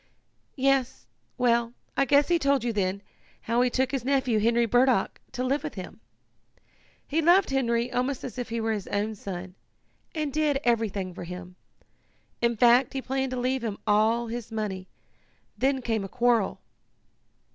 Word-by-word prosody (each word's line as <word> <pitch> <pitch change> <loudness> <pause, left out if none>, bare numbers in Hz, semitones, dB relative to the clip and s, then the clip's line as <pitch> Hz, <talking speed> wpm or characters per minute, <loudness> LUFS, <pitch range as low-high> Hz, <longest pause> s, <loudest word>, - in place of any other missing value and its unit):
"Yes. 260 - +1 0.3
Well, 235 -1 +2 0.2
I 275 - +3
guess 285 +2 +4
he 345 -1 +2
told 280 -4 +2
you 240 -1 -1
then, 200 -1 -1 0.4
how 235 +2 +1
he 250 - +3
took 260 +1 0
his 270 -4 -2
nephew, 260 -4 +1
Henry 235 +2 +3
Burdock, 245 -2 +2
to 250 - -2
live 275 +3 0
with - - -6
him. - - -8 1.1
He 315 +3 0
loved 350 +1 +4
Henry 240 -2 0
almost 255 +2 -1
as 255 0 -6
if 245 - -4
he 230 0 -2
were 225 0 0
his 205 -3 -5
own 210 +2 -1
son, 185 -3 -7 0.6
and 305 -3 -2
did 300 -2 +1
everything 210 -6 0
for 175 - -7
him. 180 +1 -8 0.9
In 235 -1 +1
fact 245 +2 +5
he 270 - -2
planned 265 0 -1
to 255 0 -3
leave 255 0 -1
him 215 -3 -3
all 220 +3 +3
his 235 0 -6
money. 200 -4 -4 0.7
Then 265 -1 0
came 225 -3 -1
a 195 - -6
quarrel." 235 -4 +1
235 Hz, 170 wpm, -27 LUFS, 215-265 Hz, 1.1 s, fact